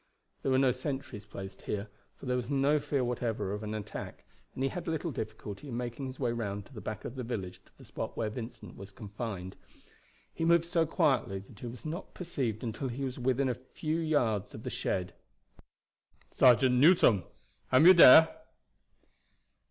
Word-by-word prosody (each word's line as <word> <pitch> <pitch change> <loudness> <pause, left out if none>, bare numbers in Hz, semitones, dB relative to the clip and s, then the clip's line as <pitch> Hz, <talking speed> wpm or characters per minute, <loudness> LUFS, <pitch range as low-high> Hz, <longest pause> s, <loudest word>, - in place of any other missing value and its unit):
There - - -1
were 130 - +4
no 135 -1 +4
sentries 130 -5 -5
placed 100 -2 -9
here, 105 +1 -4 0.3
for - - -12
there 125 -1 0
was 125 -1 -3
no 140 +2 +3
fear 140 -2 -1
whatever 115 -5 -2
of 105 - -4
an 105 0 -4
attack, 105 -2 -7 0.3
and 130 - -2
he 135 - +2
had 175 +3 -6
little 165 0 -2
difficulty 110 0 -6
in 120 -3 -4
making 125 +2 -4
his 130 0 -8
way 125 -4 0
round 105 -4 -4
to - - -18
the 110 - -8
back 110 0 -6
of - - -5
the 130 -1 -5
village 95 -6 -5
to - - -27
the - - -15
spot - - -6
where 110 -2 -1
Vincent 115 +1 -8
was 100 +1 -10
confined. 100 -3 -6 0.8
He - - -4
moved 170 0 +4
so 170 -2 +1
quietly 130 - +1
that 105 - -16
he 120 - -6
was 120 +5 -9
not 165 +5 -6
perceived 130 - -3
until 120 +4 -3
he 130 +3 -4
was 130 -1 -4
within 130 +2 +1
a 125 - +1
few 155 +6 -4
yards 125 - 0
of - - -9
the - - -4
shed. 90 -1 -2 1.2
"Sergeant 125 0 +5
Newson, 145 - +6 0.5
am 130 +5 +6
you 185 - +11
dere?" 160 -2 +10
125 Hz, 190 wpm, -30 LUFS, 110-140 Hz, 1.2 s, you